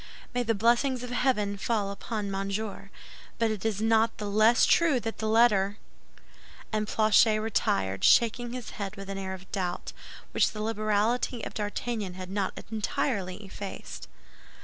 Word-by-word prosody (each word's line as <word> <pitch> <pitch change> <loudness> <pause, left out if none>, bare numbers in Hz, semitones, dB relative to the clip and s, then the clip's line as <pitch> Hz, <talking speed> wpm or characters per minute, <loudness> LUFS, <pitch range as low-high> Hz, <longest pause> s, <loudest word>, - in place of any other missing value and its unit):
"May 245 - +1
the 225 -2 0
blessings 240 +4 +2
of 250 - -6
heaven 210 -6 +1
fall 205 -1 -1
upon 205 0 -4
Monsieur! 195 +1 -3 0.5
But 230 -1 +1
it 210 -3 -4
is 220 -1 -1
not 225 0 +3
the 210 - -5
less 215 +4 +4
true 325 -7 +4
that 225 -1 -5
that 220 - -2
letter—" 215 -3 +4 1.0
And 215 -1 0
Planchet 215 0 +4
retired, 95 - 0
shaking 235 +1 +4
his 250 -3 -6
head 200 +1 -4
with 195 -1 -7
an 195 - -4
air 190 -1 -4
of 185 0 -15
doubt, 180 -2 -3 0.4
which - - +2
the 215 - -5
liberality 220 +2 0
of - - -7
D'Artagnan 210 -2 -3
had 185 0 -7
not 195 -1 -2
entirely 210 -3 -2
effaced. 195 0 -8
215 Hz, 155 wpm, -28 LUFS, 195-230 Hz, 1.0 s, less